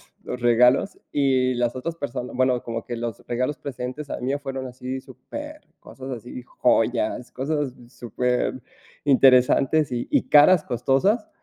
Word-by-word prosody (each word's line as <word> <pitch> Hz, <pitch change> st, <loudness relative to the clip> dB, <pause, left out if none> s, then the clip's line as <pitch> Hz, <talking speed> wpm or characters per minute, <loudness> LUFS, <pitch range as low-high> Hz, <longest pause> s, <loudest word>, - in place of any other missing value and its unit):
los, -, -, -27 dB
los 125 Hz, -, -5 dB
regalos 125 Hz, -, +3 dB
y 130 Hz, -3 st, +2 dB
las 120 Hz, +1 st, -1 dB
otras 165 Hz, +6 st, -4 dB
persona 125 Hz, -4 st, -5 dB
Bueno, 130 Hz, -1 st, +1 dB
como 115 Hz, -1 st, -5 dB
que 120 Hz, -, -4 dB
los 115 Hz, -2 st, -4 dB
regalos 125 Hz, +4 st, -2 dB
precedentes 135 Hz, +2 st, -6 dB
al -, -, -5 dB
mío 135 Hz, +3 st, -1 dB
fueron 135 Hz, -2 st, -5 dB
así 130 Hz, +1 st, -6 dB
supercosas, 135 Hz, -, -10 dB
así, 125 Hz, +1 st, -7 dB
joyas, 120 Hz, -1 st, 0 dB
cosas 140 Hz, -1 st, -2 dB
superinteresantes 130 Hz, +3 st, +1 dB
y 120 Hz, 0 st, -3 dB
y -, -, +1 dB
caras 150 Hz, +3 st, +6 dB
costosas. 135 Hz, -, +1 dB
130 Hz, 135 wpm, -23 LUFS, 125-140 Hz, -, caras